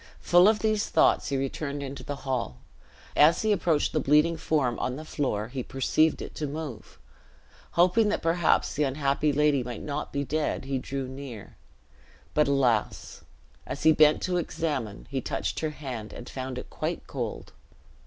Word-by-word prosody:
Full 175 Hz, +2 st, +6 dB
of 215 Hz, 0 st, +4 dB
these 215 Hz, -1 st, 0 dB
thoughts -, -, +3 dB
he 140 Hz, -, 0 dB
returned 140 Hz, +1 st, -3 dB
into 140 Hz, 0 st, -6 dB
the 145 Hz, -, -4 dB
hall. 125 Hz, -, -2 dB, 0.6 s
As 155 Hz, +7 st, +5 dB
he 215 Hz, -, +2 dB
approached 170 Hz, -6 st, +1 dB
the 155 Hz, -, +2 dB
bleeding 150 Hz, +4 st, +3 dB
form 140 Hz, -7 st, 0 dB
on 125 Hz, -, -2 dB
the 155 Hz, +3 st, -8 dB
floor, 115 Hz, -9 st, -2 dB
he 130 Hz, 0 st, -4 dB
perceived 135 Hz, +5 st, +1 dB
it -, -, -8 dB
to 150 Hz, -, 0 dB
move; 145 Hz, -6 st, -7 dB, 0.8 s
hoping 185 Hz, +5 st, +4 dB
that -, -, -1 dB
perhaps 165 Hz, 0 st, +2 dB
the 150 Hz, -, -2 dB
unhappy 140 Hz, +1 st, +1 dB
lady 145 Hz, -1 st, +3 dB
might 120 Hz, -1 st, -6 dB
not 150 Hz, 0 st, -4 dB
be 140 Hz, 0 st, -1 dB
dead, 150 Hz, 0 st, -2 dB
he 135 Hz, -1 st, -1 dB
drew 135 Hz, +1 st, -4 dB
near; 130 Hz, -5 st, -9 dB, 0.8 s
but, 150 Hz, -, +3 dB
alas! 125 Hz, -6 st, 0 dB, 0.5 s
as 130 Hz, +2 st, -5 dB
he 160 Hz, -, +7 dB
bent 155 Hz, 0 st, +5 dB
to 180 Hz, -1 st, 0 dB
examine, 135 Hz, -, -3 dB
he -, -, -1 dB
touched -, -, -3 dB
her 155 Hz, -, -1 dB
hand 130 Hz, -8 st, -7 dB
and 120 Hz, -, -9 dB
found 130 Hz, -1 st, -5 dB
it -, -, -8 dB
quite -, -, -3 dB
cold. -, -, -5 dB
145 Hz, 175 wpm, -27 LUFS, 130-155 Hz, 0.8 s, he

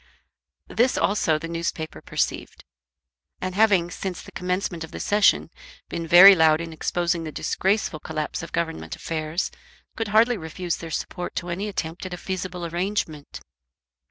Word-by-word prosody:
This 245 Hz, +3 st, +2 dB
also 165 Hz, -6 st, +2 dB
the 160 Hz, +2 st, -6 dB
newspapers 165 Hz, -1 st, -4 dB
perceived; -, -, -2 dB, 0.8 s
and 185 Hz, 0 st, -3 dB
having, 190 Hz, -4 st, +3 dB
since 185 Hz, -2 st, -4 dB
the -, -, -12 dB
commencement 180 Hz, -2 st, -2 dB
of 160 Hz, -, -8 dB
the -, -, -8 dB
Session, 205 Hz, 0 st, +3 dB, 0.4 s
been 165 Hz, -1 st, -4 dB
very 180 Hz, +4 st, +10 dB
loud 160 Hz, -3 st, +4 dB
in 165 Hz, -1 st, -6 dB
exposing 170 Hz, +1 st, -1 dB
the 155 Hz, -, -5 dB
disgraceful 190 Hz, -1 st, 0 dB
collapse 155 Hz, 0 st, -4 dB
of 165 Hz, -, -8 dB
government 120 Hz, -, -3 dB
affairs, 160 Hz, +2 st, -3 dB, 0.4 s
could 225 Hz, -, -2 dB
hardly 225 Hz, +3 st, +4 dB
refuse 170 Hz, 0 st, -4 dB
their 165 Hz, -, -8 dB
support 175 Hz, +2 st, -4 dB
to 175 Hz, -, -3 dB
any 190 Hz, +5 st, -2 dB
attempt 165 Hz, -4 st, -4 dB
at 180 Hz, -, -5 dB
a -, -, -10 dB
feasible 180 Hz, -1 st, -4 dB
arrangement. 170 Hz, -3 st, -3 dB
175 Hz, 155 wpm, -24 LUFS, 160-190 Hz, 0.8 s, very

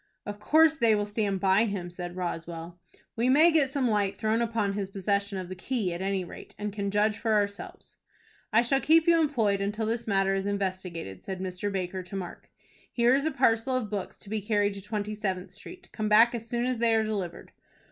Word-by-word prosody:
"Of 205 Hz, 0 st, -6 dB
course 315 Hz, +7 st, +4 dB
they 230 Hz, -5 st, +4 dB
will 205 Hz, 0 st, 0 dB
stand 205 Hz, -2 st, -1 dB
by 195 Hz, +3 st, +4 dB
him," 190 Hz, -5 st, -4 dB
said 175 Hz, 0 st, -7 dB
Roswell. 170 Hz, -1 st, -5 dB, 0.4 s
"We 235 Hz, +2 st, +1 dB
may 310 Hz, +6 st, +6 dB
get 305 Hz, -5 st, +3 dB
some 265 Hz, -2 st, 0 dB
light 205 Hz, -3 st, +1 dB
thrown 220 Hz, +2 st, 0 dB
upon 225 Hz, -4 st, 0 dB
his 195 Hz, -1 st, -3 dB
possession 200 Hz, +1 st, -1 dB
of 185 Hz, -1 st, -5 dB
the 185 Hz, -, -6 dB
key, 190 Hz, -1 st, -2 dB
at 170 Hz, -, -5 dB
any 195 Hz, -1 st, -1 dB
rate, 175 Hz, -, -11 dB
and 210 Hz, -1 st, -4 dB
can 200 Hz, -1 st, -2 dB
judge 210 Hz, +1 st, +1 dB
for 225 Hz, -2 st, 0 dB
ourselves." 205 Hz, -1 st, -3 dB, 0.5 s
"I 230 Hz, +2 st, +4 dB
shall 270 Hz, +3 st, +1 dB
keep 320 Hz, +1 st, +5 dB
you 335 Hz, -1 st, +5 dB
employed 225 Hz, -10 st, +1 dB
until 210 Hz, +3 st, -2 dB
this 230 Hz, +1 st, -2 dB
matter 195 Hz, -1 st, +2 dB
is 195 Hz, +1 st, -1 dB
investigated," 185 Hz, -, -4 dB
said 190 Hz, -2 st, -5 dB
Mr. 185 Hz, +2 st, -3 dB
Baker 185 Hz, -1 st, -3 dB
to 185 Hz, +2 st, -9 dB
Mark. 185 Hz, -3 st, -7 dB, 0.4 s
"Here 240 Hz, +1 st, +3 dB
is 280 Hz, +3 st, +2 dB
a -, -, 0 dB
parcel 245 Hz, 0 st, +2 dB
of 220 Hz, -5 st, -4 dB
books 200 Hz, -3 st, -4 dB
to 200 Hz, -, -12 dB
be 220 Hz, -1 st, -1 dB
carried 205 Hz, -1 st, +1 dB
to 195 Hz, -, -8 dB
Twenty 210 Hz, +1 st, -4 dB
Seventh 190 Hz, -4 st, -3 dB
Street. 360 Hz, -, -12 dB
Come 215 Hz, -1 st, -2 dB
back 225 Hz, +3 st, +6 dB
as 230 Hz, -1 st, -6 dB
soon 240 Hz, 0 st, -1 dB
as 255 Hz, -2 st, -1 dB
they 230 Hz, -1 st, +3 dB
are 220 Hz, -, +3 dB
delivered." 200 Hz, -6 st, -4 dB
205 Hz, 220 wpm, -28 LUFS, 190-230 Hz, 0.5 s, may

